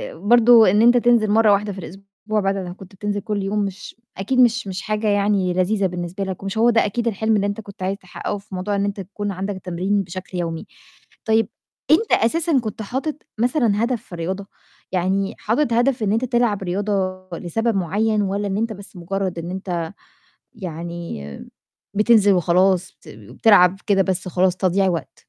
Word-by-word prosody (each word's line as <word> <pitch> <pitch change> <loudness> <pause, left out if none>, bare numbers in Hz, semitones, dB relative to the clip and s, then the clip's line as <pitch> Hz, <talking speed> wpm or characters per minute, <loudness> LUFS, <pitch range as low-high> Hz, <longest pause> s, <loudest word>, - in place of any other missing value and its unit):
برضه 235 0 +6
إن 210 +2 +3
أنت 240 +1 +6
تنزل 235 -3 +3
مرّة 220 -1 +5
واحدة 200 0 +1
في 190 - -8
الأسبوع 195 +4 -5
بعد 195 0 0
ما 180 -2 -5
كنت 190 +1 -14
بتنزل 205 +1 -3
كل 205 -1 -3
يوم 205 +2 -1
مش 195 0 -8 0.2
أكيد 235 +7 -1
مش 235 -3 +3
مش 190 -1 -4
حاجة 215 0 -2
يعني 200 -3 +2
لذيذة 195 +3 +1
بالنسبة 175 +2 -5
لك 190 0 -5
ومش 195 +2 -4
هو 230 +2 +4
ده 230 -1 +3
أكيد 235 +3 -2
الحلم 220 0 +1
اللي 200 -1 +1
أنت 205 +2 -4
كنت 200 -2 -10
عايز 195 +1 -1
تحقَّقه 185 +2 -5
في 200 -1 -10
موضوع 200 +3 -2
إن 200 0 0
أنت 200 0 -3
يكون 200 +2 -5
عندك 195 +2 -4
تمرين 190 +3 -1
بشكل 180 +1 -7
يومي. 165 -2 -3 0.6
طيب 220 0 +2 0.4
أنت 405 +8 +3
أساسًا 320 +4 +2
كنت 220 -1 -5
حاطط 265 +8 -3 0.2
مثلًا 235 -4 +2
هدف 240 -2 -1
في - - -28
الرياضة؟ 185 +4 -4 0.4
يعني 190 +2 0
حاطط 235 +3 0
هدف 245 +1 +2
إن 205 - +1
أنت 230 +4 +1
تلعب 240 -5 +1
رياضة 195 +3 -2 0.4
لسبب 225 +7 -1
معيّن 205 +4 +1
والَّا 200 +1 -1
إن 195 0 -2
أنت 225 +1 -1
بس 200 0 -13
مُجرّد 185 0 -3
إن 170 +2 -6
أنت 180 -3 -3 0.7
يعني 170 - -6 0.7
بتنزل 210 -1 +5
وخلاص، 185 +1 +2
بت - - -19
بتلعب 180 - +3
كده 195 -2 +4
بس 190 -1 -2
خلاص 180 0 +1
تضييع 190 +1 +2
وقت؟ 165 -6 -4
200 Hz, 185 wpm, -21 LUFS, 185-220 Hz, 0.7 s, برضه